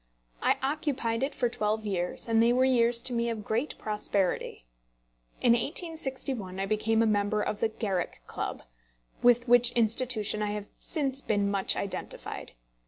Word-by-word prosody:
I - - +3
occupied 270 -6 -1
it 270 +2 -1
for 245 - +1
twelve 215 -2 -1
years, 180 -1 -2
and 225 -1 +3
they 235 +1 +5
were 255 +1 +4
years 235 -2 +4
to 250 - 0
me 235 0 0
of 220 -2 -4
great 235 +7 -1
prosperity. 205 - -1 0.8
In 240 - +6
1861 265 - -2
I 195 - 0
became 220 +2 +2
a - - +3
member 210 0 +1
of 210 - -2
the 225 - +2
Garrick 200 -5 -3
Club, - - -5 0.6
with 245 0 +4
which 245 0 +6
institution 225 -2 0
I 210 0 -1
have 210 -1 -4
since 275 -4 -1
been 205 -4 0
much 195 -1 +2
identified. 200 - -5
230 Hz, 160 wpm, -29 LUFS, 210-250 Hz, 0.8 s, In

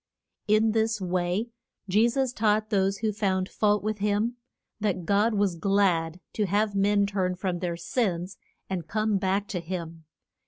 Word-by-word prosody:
In 215 +1 +4
this 220 0 +1
way 180 +4 -1 0.4
Je 215 +5 +4
sus 265 0 0
taught 215 0 +1
those 195 -1 +2
who 215 0 -1
found 190 -2 0
fault 210 -1 +1
with 215 0 -2
him, 210 +3 0 0.4
that 195 -5 -1
God 210 +4 +2
was 200 -3 +2
glad 175 -2 +1
to 210 -2 0
have 205 +2 +1
men 200 +1 +3
turn 190 -2 -1
from 180 -1 -2
their 170 -1 -2
sins 180 -2 -2 0.3
and 175 -4 -4
come 215 +2 +1
back 195 +1 0
to 180 - -2
him. 165 -2 -6
200 Hz, 160 wpm, -27 LUFS, 180-215 Hz, 0.4 s, In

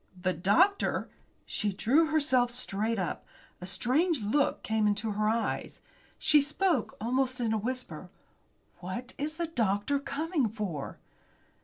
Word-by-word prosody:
"The 185 0 0
doctor?" 330 - +2 0.4
She 210 -1 -1
drew 270 - +3
herself 280 -6 +3
straight 225 -2 -1
up. 185 -3 -3 0.4
A 180 - -6
strange 265 - +1
look 275 +8 +1
came 220 -1 +1
into 210 +1 0
her 210 +1 +1
eyes. 230 +1 -2 0.4
She 300 -2 +5
spoke 300 - 0
almost 255 +3 0
in 230 -2 0
a - - +2
whisper. 250 +4 -4 0.7
"What 190 +8 -6
is 305 +2 -2
the 340 +1 -1
doctor 235 -2 0
coming 285 -2 -1
for?" 195 -10 -5
240 Hz, 135 wpm, -29 LUFS, 210-290 Hz, 0.7 s, She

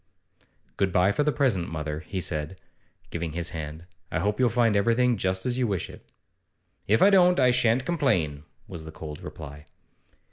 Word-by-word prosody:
'Good 95 -1 +1
bye 90 +2 +3
for 125 - 0
the 150 +1 +2
present, 125 - +1
mother,' 75 -1 -4
he 95 +3 -5
said, 80 +1 -3 0.5
giving 85 -2 -4
his 85 +1 -2
hand 80 0 -6 0.3
'I - - 0
hope 105 +3 -1
you'll 125 -2 +4
find 115 -2 +2
everything 115 +4 +3
just 95 -2 -1
as 125 0 0
you 125 - +2
wish 100 -4 -2
it.' - - -16 0.8
'If 110 +2 +4
I 200 - +7
don't, 180 -3 +5
I 125 -1 +5
shan't 125 0 +2
complain,' 90 - 0 0.3
was 85 -5 -8
the 80 - -8
cold 75 -1 -8
reply. 75 -1 -9
95 Hz, 180 wpm, -26 LUFS, 80-125 Hz, 0.8 s, I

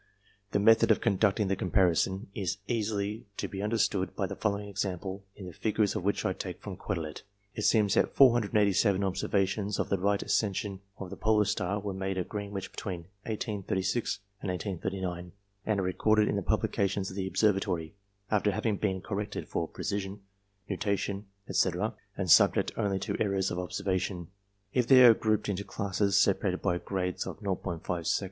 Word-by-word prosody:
The - - +2
method 110 +3 +5
of 110 - +5
con 100 -2 +1
ducting 100 -1 +3
the 95 - +1
comparison 95 +1 +2
is 95 -1 -2
easily 110 -1 -2
to - - -2
be 95 - -5
understood 105 -3 0
by 100 - 0
the - - -5
following 105 -1 -1
example, 95 -1 -3
the 95 -3 -7
figures 105 +3 0
of - - -1
which 100 +2 0
I 95 - +1
take 90 -1 -6
from 100 -3 -7
Quetelet. 85 -6 -4 0.3
It 105 - -3
seems 105 -3 +4
that - - +2
487 105 -5 +4
observations 100 +1 0
of - - -1
the 100 - +1
Right 100 +2 +1
Ascension 100 -2 0 0.2
of 95 -2 -7
the - - -7
Polar 110 -1 +3
Star 100 -1 -1
were 100 -1 -4
made 95 0 -3
at 90 - -2
Greenwich 100 -2 -5
between 90 -4 -5 0.3
1836 100 -1 -2 0.2
and 100 - -3
1839, 90 -1 -3 0.3
and 105 -2 +2
are - - 0
recorded 105 +4 +2
in - - 0
the 100 - 0
publica 100 +1 +1
tions 95 0 -3
of - - -9
the 95 -1 -2
Observatory, 95 -4 +1 0.4
after 105 -1 +3
having 105 +1 0
been 95 -3 -1
corrected 105 +1 -4
for 85 - -2
precession, 100 +2 -4 0.5
nutation, 100 0 -2 0.2
&c., - - +3 0.5
and 95 -4 0
subject - - +6
only 100 -1 0
to 95 - -3
errors 100 -2 +1
of 90 - -2
observation. 90 0 -2 0.4
If 125 -2 +2
they 130 -1 +9
are 120 - +10
grouped 110 -1 0
into 100 -1 -2
classes 100 0 0
separated 95 -2 +2
by 90 - +1
grades 90 -1 -2
of - - -6
0'5 90 -3 -3
sec. - - +3
100 Hz, 175 wpm, -30 LUFS, 95-105 Hz, 0.5 s, are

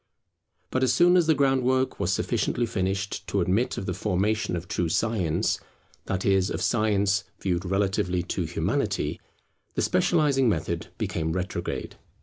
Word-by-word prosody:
But 130 - 0
as 130 -2 +3
soon 175 +7 +5
as 175 -3 +4
the 160 - +4
groundwork 130 -1 +2
was - - 0
sufficiently 120 - 0
finished 100 -1 -2
to 100 - 0
admit 95 +7 +1
of 95 - -4
the 90 - -2
formation 105 +2 0
of 85 +1 -5
true 85 -1 -1
Science, 95 -4 0 0.5
that 95 -1 -2
is, 95 0 +3
of - - -3
Science 105 -3 +1
viewed 90 -1 -1
relatively 95 -2 0
to 85 - -2
Humanity, - - -1 0.5
the - - +1
specializing 155 -8 +3
method 85 -3 -2
became 80 -1 -2
retrograde. 90 +1 -4
100 Hz, 145 wpm, -26 LUFS, 90-130 Hz, 0.5 s, soon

